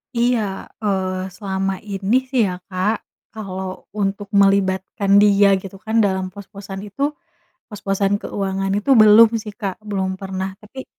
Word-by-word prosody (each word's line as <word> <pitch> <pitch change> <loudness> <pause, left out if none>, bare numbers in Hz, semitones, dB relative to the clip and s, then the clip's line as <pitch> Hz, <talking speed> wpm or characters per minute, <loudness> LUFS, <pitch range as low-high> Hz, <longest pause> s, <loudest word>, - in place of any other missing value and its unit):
Iya, 240 0 +2 0.4
eee, 190 -2 -1
selama 195 -1 -2
ini 200 +1 -1 0.2
sih 260 -3 +3
ya, 180 - -3 0.2
Kak, 185 +4 +1 0.4
kalau 190 -3 -6
untuk 200 0 -3
melibatkan 195 0 +3
dia 205 -1 +5
gitu 195 0 -10
kan 220 +1 +1
dalam 190 -1 -1
pos-posan 195 0 -9
itu, 205 +7 -10 0.7
pos-posan 200 -1 -1
keuangan 195 -1 -3
itu 210 +7 -1
belum 215 +2 +8
sih, 210 -1 -8
Kak, 195 -2 -4
belum 190 -3 -3
pernah. 190 0 -4
Tapi 260 +5 -10
200 Hz, 135 wpm, -20 LUFS, 190-210 Hz, 0.7 s, belum